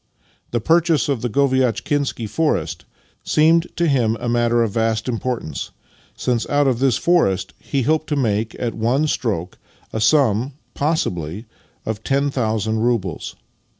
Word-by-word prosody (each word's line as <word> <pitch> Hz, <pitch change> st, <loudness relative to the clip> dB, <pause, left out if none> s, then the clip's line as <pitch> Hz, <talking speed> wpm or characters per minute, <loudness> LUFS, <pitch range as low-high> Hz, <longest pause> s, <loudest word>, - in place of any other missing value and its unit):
The 120 Hz, -, 0 dB
purchase 165 Hz, -, +2 dB
of 135 Hz, -5 st, 0 dB
the 120 Hz, -, -1 dB
Goviatchkinsky 130 Hz, 0 st, +1 dB
forest 150 Hz, +9 st, -1 dB, 0.4 s
seemed 165 Hz, +2 st, +3 dB
to 170 Hz, -, +1 dB
him 120 Hz, -6 st, +2 dB
a -, -, -4 dB
matter 120 Hz, 0 st, +2 dB
of 110 Hz, -, -1 dB
vast 110 Hz, +1 st, 0 dB
importance, 115 Hz, -, -3 dB, 0.5 s
since 120 Hz, -2 st, -1 dB
out 145 Hz, 0 st, +3 dB
of 130 Hz, -3 st, +1 dB
this 135 Hz, -2 st, +3 dB
forest 95 Hz, -, +1 dB
he 135 Hz, -2 st, -2 dB
hoped 155 Hz, +3 st, +1 dB
to 150 Hz, -, -1 dB
make, 110 Hz, -4 st, 0 dB
at 120 Hz, -2 st, -2 dB
one 120 Hz, +7 st, +1 dB
stroke, 100 Hz, -, -2 dB, 0.3 s
a 110 Hz, -, -2 dB
sum, 130 Hz, -1 st, +3 dB, 0.2 s
possibly, 105 Hz, -, -2 dB, 0.4 s
of 110 Hz, 0 st, -4 dB
ten 140 Hz, +1 st, +1 dB
thousand 110 Hz, -3 st, -1 dB
roubles. 110 Hz, -7 st, -1 dB
120 Hz, 145 wpm, -20 LUFS, 110-145 Hz, 0.5 s, seemed